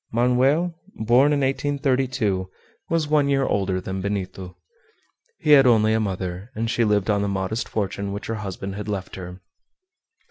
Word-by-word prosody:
Manoel, 130 +9 +2 0.2
born 120 +6 +4
in 145 -1 +1
1832, 130 -8 0 0.4
was 165 -2 +1
one 145 -2 +2
year 135 -1 +2
older 95 -2 0
than 95 +1 -5
Benito. 95 -2 -4 0.8
He 150 - 0
had 135 -3 +8
only 110 -2 +4
a 110 - +2
mother, 95 -1 -4
and 115 +1 -1
she 120 - +1
lived 105 -1 +2
on 100 -1 +1
the 100 - 0
modest 100 +3 -2
fortune 100 -1 -3
which 100 +1 -5
her 115 - -3
husband 95 -1 -5
had 105 +2 -6
left 100 -3 -4
her. 90 0 -8
110 Hz, 165 wpm, -23 LUFS, 95-130 Hz, 0.8 s, had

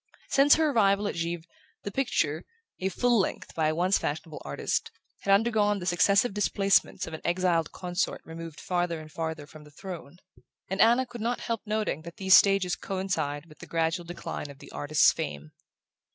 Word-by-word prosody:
Since 280 +1 +6
her 315 -2 +2
arrival 205 -4 +3
at - - -2
Givre 170 0 -3 0.4
the 200 - -4
picture 165 - 0 0.4
a 190 - 0
"full 240 +4 +2
length" 190 - -2
by 160 -2 +1
a 155 - 0
once 180 +4 +2
fashionable 155 +1 -4
artist 70 - -2 0.3
had 200 - -1
undergone 210 0 +3
the 180 - -6
successive 195 +5 +3
displacements 200 -1 +2
of 160 - -9
an 160 - -6
exiled 175 -2 +1
consort 180 0 -2
removed 165 -1 -8
farther 175 -2 -1
and 155 0 -11
farther 160 -2 -4
from 150 +1 -14
the 150 - -15
throne; 170 -1 -9 0.5
and 190 +1 -1
Anna 240 +3 +5
could 240 -2 -9
not 240 +2 -1
help 230 -2 -2
noting 215 -7 -1
that 170 +1 -11
these 190 -1 +3
stages 195 -3 +4
coincided 180 -6 -3
with 155 - -17
the - - -10
gradual 165 +2 0
decline 170 -3 -6
of 140 - -11
the - - -13
artist's 150 +1 +4
fame. 75 +1 -5
180 Hz, 180 wpm, -28 LUFS, 160-200 Hz, 0.5 s, Since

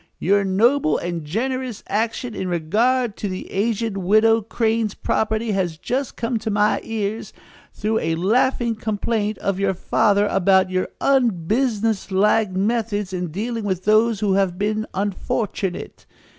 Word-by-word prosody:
Your 200 +2 +2
noble 200 - +2
and 170 -2 -4
generous 250 - -3
action 225 +3 -2
in 190 - -4
regard 215 +8 +1
to 205 - -3
the 185 0 -6
aged 220 +1 -1
widow 215 +4 +4
Crane's 225 -1 -1
property 220 +1 -1
has 180 -5 -1
just 260 - -3
come 230 0 -2
to 220 +1 -4
my 210 0 +2
ears, 220 -1 -4 0.4
through 220 +1 -1
a 160 0 -1
laughing 235 +6 +1
complaint 215 0 -2
of 195 -1 -2
your 195 -1 +1
father 200 +3 +2
about 190 0 +3
your 185 0 0
unbusinesslike 220 -3 +1
methods 205 0 -1
in 180 -1 -2
dealing 220 +7 -4
with 190 -3 -2
those 215 +1 +3
who 205 -2 +2
have 190 -2 +1
been 215 +2 -1
unfortunate. 195 -1 -3
210 Hz, 140 wpm, -21 LUFS, 190-225 Hz, 0.4 s, widow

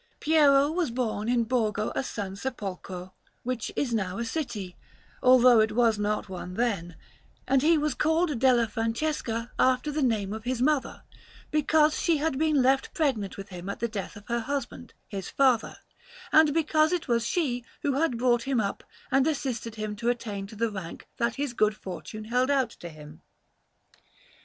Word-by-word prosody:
Piero 290 -2 +4
was 340 -3 0
born 230 -3 -2
in 240 -1 +3
Borgo 215 -3 0
a - - -1
San 200 -6 -5
Sepolcro, 190 -5 -6 0.3
which 250 -2 -3
is 250 -5 -1
now 195 -4 -1
a 235 - -2
city, 225 - -4 0.5
although 250 -2 +7
it 215 0 +2
was 230 -2 +3
not 210 0 -1
one 180 -1 -7
then; 195 -8 -1 0.5
and 270 0 +3
he 320 +3 +4
was 300 0 0
called 320 -3 +1
Della 250 -2 +4
Francesca 230 0 -2
after 260 +3 +2
the 300 +1 -1
name 215 -6 0
of 220 0 -6
his 250 0 -2
mother, 280 +1 0 0.5
because 305 0 +3
she 335 -3 +2
had 290 -2 -1
been 305 -4 +3
left 265 +1 +1
pregnant 255 - -1
with 195 +1 -8
him 180 0 -7
at 200 - -5
the 235 - 0
death 210 -4 -6
of 205 0 -13
her 235 0 0
husband, 250 0 -5
his 195 -3 -6
father, 260 -5 +2 0.5
and 310 -1 +6
because 310 0 +2
it 355 -2 -1
was 235 -2 +2
she 250 -3 -1 0.2
who 285 - +1
had 275 -3 +1
brought 240 -1 +2
him 265 -1 0
up 200 -2 -2 0.3
and 270 +2 +3
assisted 250 -7 -2
him 215 -1 -4
to 235 +3 -1
attain 210 -5 -3
to 215 - -12
the 230 +1 -1
rank 190 -5 -8
that 235 0 0
his 280 -3 -3
good 215 -2 +1
fortune 195 +4 -7
held 250 +4 +1
out 265 -4 +2
to 175 - -9
him. 150 -1 -13
240 Hz, 180 wpm, -27 LUFS, 210-275 Hz, 0.5 s, although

